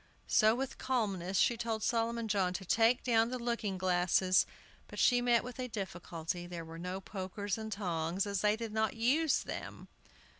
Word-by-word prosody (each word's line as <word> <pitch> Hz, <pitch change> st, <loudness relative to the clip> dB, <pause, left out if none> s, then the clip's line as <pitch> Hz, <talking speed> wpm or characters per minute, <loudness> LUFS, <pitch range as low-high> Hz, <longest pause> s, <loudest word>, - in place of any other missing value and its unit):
So 220 Hz, 0 st, +4 dB
with 265 Hz, +1 st, -4 dB
calmness 195 Hz, -8 st, -1 dB
she 240 Hz, -, +4 dB
told 225 Hz, -2 st, -3 dB
Solomon 230 Hz, 0 st, 0 dB
John 190 Hz, -3 st, +1 dB
to 190 Hz, +1 st, -5 dB
take 230 Hz, +6 st, +3 dB
down 230 Hz, -2 st, +3 dB
the 255 Hz, -, -3 dB
looking 235 Hz, -5 st, -2 dB
glasses. 185 Hz, 0 st, +3 dB, 0.4 s
But -, -, -10 dB
she 245 Hz, -1 st, +4 dB
met 240 Hz, -1 st, +3 dB
with 250 Hz, +1 st, -8 dB
a 255 Hz, -, -2 dB
difficulty, 175 Hz, -5 st, -5 dB
there 170 Hz, -2 st, -6 dB
were 165 Hz, +1 st, -9 dB
no 180 Hz, +2 st, -4 dB
pokers 195 Hz, +1 st, -4 dB
and 220 Hz, -1 st, -6 dB
tongs, 175 Hz, -2 st, -1 dB
as 200 Hz, -2 st, -2 dB
they 210 Hz, 0 st, +3 dB
did 225 Hz, -1 st, -6 dB
not 220 Hz, 0 st, 0 dB
use 275 Hz, +7 st, +2 dB
them. -, -, -7 dB
210 Hz, 180 wpm, -33 LUFS, 185-235 Hz, 0.4 s, So